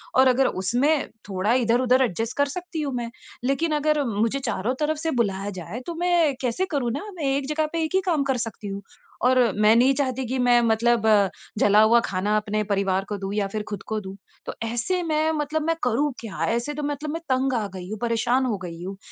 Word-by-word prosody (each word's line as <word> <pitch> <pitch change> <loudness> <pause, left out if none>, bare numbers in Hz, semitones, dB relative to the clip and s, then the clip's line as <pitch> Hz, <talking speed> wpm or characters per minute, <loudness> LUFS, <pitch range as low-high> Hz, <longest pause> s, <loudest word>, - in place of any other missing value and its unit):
और 260 +1 +6
अगर 260 +1 +4
उसमें 275 +9 +1 0.2
थोड़ा 190 +3 0
इधर-इधर 250 +1 +3
एडजस्ट 225 +1 -2
कर 285 - +4
सकती 335 +1 -5
हूँ 280 -3 -2
मैं। 235 -1 -3 0.3
लेकिन 290 +5 0
अगर 300 0 +1
मुझे 230 +4 0
चारों 235 -2 -2
तरफ़ 305 0 0
से 320 +1 -2
बुलाया 205 -5 -1
जाए 210 +7 -6
तो 340 - -3
मैं 345 -5 +3
कैसे 255 +9 0
करूँ 250 -5 0
ना, 280 - -4
मैं 310 - -5
एक 280 -1 -2
जगह 310 +1 +1
पे 330 -1 0
एक 315 +4 -2
ही 380 - +4
काम 315 -6 +2
कर 265 -2 0
सकती 225 -3 -5
हूँ। 200 0 -5 0.4
और 255 +1 +4 0.2
मैं 215 +1 +6
नहीं 255 +3 +5
चाहती 260 -2 -1
की 260 +2 -2
मैं 240 0 +6
मतलब 230 0 +2 0.5
जला 210 +1 +5
हुआ 230 +2 +6
खाना 200 +3 0
अपने 215 0 -1
परिवार 195 0 0
को 205 - -2
दूँ 195 +1 -4
या 200 -2 0
फिर 215 - -1
ख़ुद 205 -2 -5
को 220 -1 -1
दूँ 190 -1 -8 0.3
तो - - -4
ऐसे 240 +11 -1
मैं 315 -1 +1
मतलब 305 0 -1
मैं 330 - +2
करूँ 260 +5 +1
क्या? 220 -5 -5
ऐसे 235 +6 -1
तो 300 0 -5
मतलब 290 +1 -3
मैं 330 - -4
तंग 260 +1 +1
आ 225 -4 0
गई 180 0 -7
हूँ, 215 - -4
परेशान 240 +2 +1
हो 220 -5 -1
गई 170 0 -7
हूँ 195 +1 -6
245 Hz, 225 wpm, -24 LUFS, 215-290 Hz, 0.5 s, और